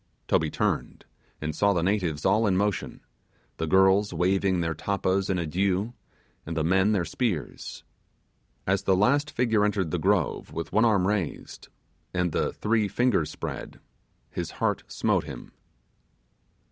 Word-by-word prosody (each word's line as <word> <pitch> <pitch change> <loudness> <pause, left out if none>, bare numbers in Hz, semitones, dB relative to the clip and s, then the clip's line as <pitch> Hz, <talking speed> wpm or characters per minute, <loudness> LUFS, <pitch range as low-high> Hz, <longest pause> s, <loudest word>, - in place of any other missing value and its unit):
Toby - - +2
turned, - - -2 0.4
and 75 0 -3
saw 100 +4 +3
the 85 -3 0
natives 90 -6 0
all 110 +1 +3
in 95 -2 +2
motion 100 0 -1 0.6
the 80 - -2
girls 95 +3 +4
waving 95 +2 +1
their 80 -1 0
tappas 95 +2 -1
in 95 - +1
adieu, 95 +6 0 0.5
and 85 +1 -5
the 80 - +1
men 95 +5 +3
their 95 -5 +1
spears. 90 - -3 0.8
As 95 0 +1
the 95 - +2
last 140 +10 +2
figure 115 -6 +1
entered 100 -5 0
the 90 - -1
grove 95 -2 0
with 85 0 -5
one 110 +2 +4
arm 100 -5 +3
raised, 100 -6 -3 0.5
and 90 -1 +1
the - - 0
three 110 -1 +1
fingers 100 -6 +1
spread, - - -6 0.5
his - - -4
heart - - 0
smote - - 0
him. - - -9
95 Hz, 145 wpm, -26 LUFS, 85-105 Hz, 0.8 s, girls